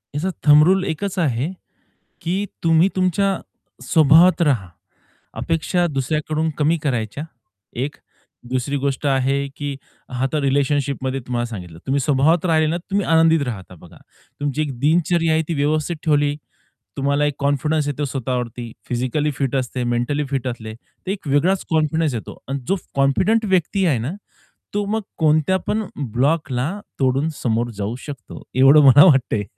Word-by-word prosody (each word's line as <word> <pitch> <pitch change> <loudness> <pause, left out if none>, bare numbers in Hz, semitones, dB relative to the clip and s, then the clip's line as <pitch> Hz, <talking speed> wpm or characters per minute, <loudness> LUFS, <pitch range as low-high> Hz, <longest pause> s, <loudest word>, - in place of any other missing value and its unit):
याचा 175 +6 -1
thumb 150 0 +7
rule 190 +1 +3
एकच 190 +3 -3
आहे, 140 +1 0 0.7
की 185 +4 -1 0.2
तुम्ही 165 +3 +4
तुमच्या 185 +1 +1 0.5
स्वभावात 165 +4 +5
राहा. 120 - +1 0.7
अपेक्षा 170 +2 0
दुसऱ्याकडून 155 +2 -1
कमी 155 +3 +2
करायच्या, 125 0 -2 0.6
एक. 145 +2 -4 0.5
दुसरी 130 +2 -1
गोष्ट 140 +1 -2
आहे, 135 +1 +1
की 145 -1 -4 0.3
हा 125 0 -3
आता 150 +3 -1
रिलेशनशिपमध्ये 140 -1 0
तुम्हाला 120 -1 -2
सांगितलं, 90 -8 -9
तुम्ही 140 +1 +1
स्वभावात 150 +6 +2
राहिले 160 -2 +3
ना 170 - 0
तर 180 +3 -11
तुम्ही 200 -1 0
आनंदित 165 -1 +4
राहता 95 -6 -6
बघा. 85 0 -16 0.4
तुमची 145 +1 -1
एक 135 -5 -5
दिनचर्या 165 +3 +2
आहे 160 0 +2
ती 165 - -1
व्यवस्थित 155 +3 0
ठेवली. 145 -2 +2 0.6
तुम्हाला 140 +2 +1
एक 145 -1 0
कॉन्फिडन्स 145 +2 0
येतो 145 +1 -2
स्वतःवरती. 125 -3 -4 0.2
फिजिकली 130 +5 -1
फिट 135 -2 -1
असते, 125 -1 -2
मेंटली 120 +5 -1
फिट 135 -2 -2
असले 110 -2 -6
तर 185 +9 -11
एक 195 -7 -5
वेगळाच 175 +8 +2
कॉन्फिडन्स 155 -2 +1
येतो 110 - -7
आणि 140 +1 -2
जो 195 - +2 0.2
कॉन्फिडंट 185 +12 +2
व्यक्ती 185 +2 +1
आहे 140 -8 +2
ना 125 +9 -3 0.6
तो 205 0 0
मग 220 +2 -1 0.2
कोणत्यापण 165 +7 +1 0.3
ब्लॉकला 135 0 0 0.3
तोडून 135 +4 +1
समोर 120 0 0
जाऊ 105 +3 -3
शकतो 140 -5 -9
एवढं 135 +3 +7
मला 140 +4 +8
वाटतंय. 130 - +3
145 Hz, 150 wpm, -20 LUFS, 130-160 Hz, 0.7 s, मला